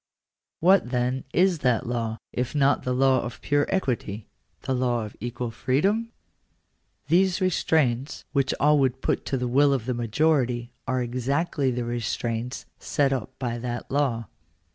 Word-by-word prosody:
What, 185 Hz, -5 st, +5 dB
then, 125 Hz, +1 st, -1 dB
is 180 Hz, -2 st, +3 dB
that 125 Hz, -5 st, +1 dB
law, 115 Hz, -2 st, -2 dB, 0.2 s
if 125 Hz, +3 st, -2 dB
not 140 Hz, -1 st, +3 dB
the 125 Hz, -, -2 dB
law 130 Hz, +1 st, +3 dB
of 120 Hz, 0 st, -6 dB
pure 145 Hz, 0 st, +1 dB
equity 120 Hz, -, -2 dB, 0.2 s
— -, -, -44 dB
the 130 Hz, -, -1 dB
law 120 Hz, -3 st, 0 dB
of 105 Hz, -, -10 dB
equal 120 Hz, 0 st, -4 dB
freedom? 195 Hz, -, 0 dB, 1.0 s
These 185 Hz, +1 st, +3 dB
restraints, 155 Hz, -, +1 dB
which 140 Hz, -2 st, +1 dB
all 150 Hz, +1 st, +4 dB
would 130 Hz, -1 st, 0 dB
put -, -, 0 dB
to 135 Hz, -, 0 dB
the 125 Hz, 0 st, -2 dB
will 140 Hz, +3 st, +4 dB
of 125 Hz, -5 st, -1 dB
the 125 Hz, -, -1 dB
majority, 120 Hz, 0 st, +1 dB, 0.2 s
are 130 Hz, -1 st, 0 dB
exactly 135 Hz, +4 st, 0 dB
the 125 Hz, -1 st, -2 dB
restraints 120 Hz, +1 st, -3 dB
set 140 Hz, -2 st, +1 dB
up 130 Hz, +1 st, -5 dB
by 120 Hz, -2 st, -3 dB
that 120 Hz, 0 st, -5 dB
law. 130 Hz, -5 st, 0 dB
130 Hz, 160 wpm, -25 LUFS, 120-145 Hz, 1.0 s, What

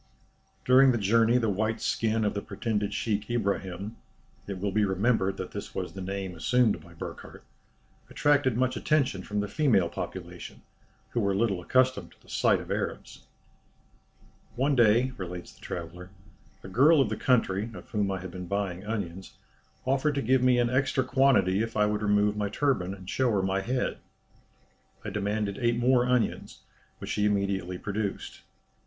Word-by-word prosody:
During 130 Hz, +1 st, +6 dB
the 120 Hz, -, +1 dB
journey 115 Hz, +3 st, +3 dB
the 115 Hz, -2 st, +1 dB
white 110 Hz, +3 st, -1 dB
skin 110 Hz, -1 st, 0 dB
of 105 Hz, -, 0 dB
the 100 Hz, -, -3 dB
pretended 105 Hz, 0 st, -2 dB
sheik 105 Hz, 0 st, -2 dB
Ibrahim 100 Hz, -2 st, -2 dB, 0.5 s
(it 100 Hz, -2 st, -4 dB
will 100 Hz, +1 st, -1 dB
be 105 Hz, +2 st, +2 dB
remembered 95 Hz, 0 st, +1 dB
that 95 Hz, -, -6 dB
this -, -, -7 dB
was 80 Hz, -, -4 dB
the 95 Hz, -, -7 dB
name 95 Hz, 0 st, -4 dB
assumed 110 Hz, +2 st, +2 dB
by 85 Hz, 0 st, -16 dB
Burckhardt) -, -, -9 dB, 0.7 s
attracted 145 Hz, -5 st, +2 dB
much 130 Hz, 0 st, +1 dB
attention 140 Hz, -10 st, +1 dB
from 105 Hz, +2 st, -2 dB
the 105 Hz, -, -3 dB
female 110 Hz, -, +2 dB
population, -, -, -7 dB, 0.5 s
who 120 Hz, -, -1 dB
were 100 Hz, -3 st, +1 dB
little 100 Hz, -3 st, 0 dB
accustomed 130 Hz, -3 st, +1 dB
to -, -, -29 dB
the -, -, -20 dB
sight -, -, +2 dB
of -, -, -8 dB
Arabs. -, -, -4 dB, 1.3 s
"One 135 Hz, +3 st, +1 dB
day," 120 Hz, +2 st, +4 dB
relates 90 Hz, -2 st, -7 dB
the -, -, -23 dB
traveller, 90 Hz, +1 st, -7 dB, 0.5 s
"a -, -, -8 dB
girl 140 Hz, -, +5 dB
of 130 Hz, -6 st, +3 dB
the 110 Hz, -, -2 dB
country, 110 Hz, -3 st, +1 dB
of -, -, -12 dB
whom 105 Hz, -3 st, 0 dB
I 95 Hz, -2 st, -3 dB
had 95 Hz, -1 st, -7 dB
been 90 Hz, 0 st, -7 dB
buying 100 Hz, -1 st, -2 dB
onions, 95 Hz, -4 st, -5 dB, 0.5 s
offered 135 Hz, +3 st, +1 dB
to 140 Hz, -, -1 dB
give 130 Hz, +3 st, +3 dB
me 125 Hz, -1 st, +4 dB
an 120 Hz, 0 st, +2 dB
extra 130 Hz, 0 st, +1 dB
quantity 130 Hz, -7 st, +3 dB
if 115 Hz, 0 st, -3 dB
I 105 Hz, -, +4 dB
would 105 Hz, 0 st, -1 dB
remove 105 Hz, 0 st, +2 dB
my 105 Hz, -1 st, -1 dB
turban, 100 Hz, -7 st, 0 dB
and 95 Hz, -2 st, -13 dB
show 130 Hz, +5 st, +1 dB
her 95 Hz, -2 st, +1 dB
my 95 Hz, 0 st, 0 dB
head. 125 Hz, +5 st, -2 dB, 1.1 s
I 105 Hz, -, -4 dB
demanded 105 Hz, 0 st, -2 dB
eight 120 Hz, -1 st, +1 dB
more 125 Hz, 0 st, +3 dB
onions, 125 Hz, -2 st, -1 dB, 0.4 s
which -, -, -6 dB
she 105 Hz, -, +1 dB
immediately 100 Hz, -3 st, -1 dB
produced. 100 Hz, +1 st, -4 dB
105 Hz, 175 wpm, -28 LUFS, 95-125 Hz, 1.3 s, During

